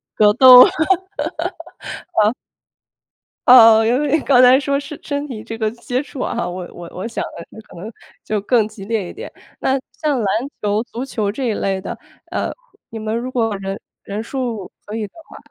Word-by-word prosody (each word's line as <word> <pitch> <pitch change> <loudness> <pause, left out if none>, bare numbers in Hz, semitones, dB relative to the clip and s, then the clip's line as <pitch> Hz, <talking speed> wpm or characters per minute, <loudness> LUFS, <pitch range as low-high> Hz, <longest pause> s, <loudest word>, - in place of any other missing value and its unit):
格 210 -1 +5
斗 255 +1 +10
啊， - - +4 1.6
嗯。 215 - +2 1.1
呃， 225 -3 +8
因 245 +4 +2
为 295 +1 +2
刚 260 -3 +4
才 255 +1 +7
说 280 0 0
是 285 +1 -8
身 285 0 -3
体 225 -6 -7
这 225 0 -7
个 220 -1 0
接 245 +2 -3
触 280 -2 -8
啊 - - -2
哈， 175 - -2
我 180 0 -6
我 175 -1 -9
我 185 - -5
想 230 - -4 0.2
的 220 - -11
可 - - -15
能 205 +6 -7 0.3
就 215 - -1
更 220 +2 +2
激 215 -3 -11
烈 210 -4 -2
一 - - -9
点。 450 +6 -8 0.3
那， 265 - +1
像 300 -3 -1
篮 210 - -1 0.3
球 210 +1 0
足 240 +1 -6
球 220 -6 -2
这 245 +7 -4
一 - - 0
类 195 -2 -2
的， - - -6 0.3
呃， - - -2 0.4
你 225 - -7
们 215 +1 -3
如 245 +2 -4
果 225 -4 0
人 195 0 -5 0.3
人 205 +2 -5
数 235 -6 -4
可 210 - -7
以 220 -1 -2
的 - - -28
话 - - -12
225 Hz, 210 characters per minute, -19 LUFS, 210-255 Hz, 1.6 s, 斗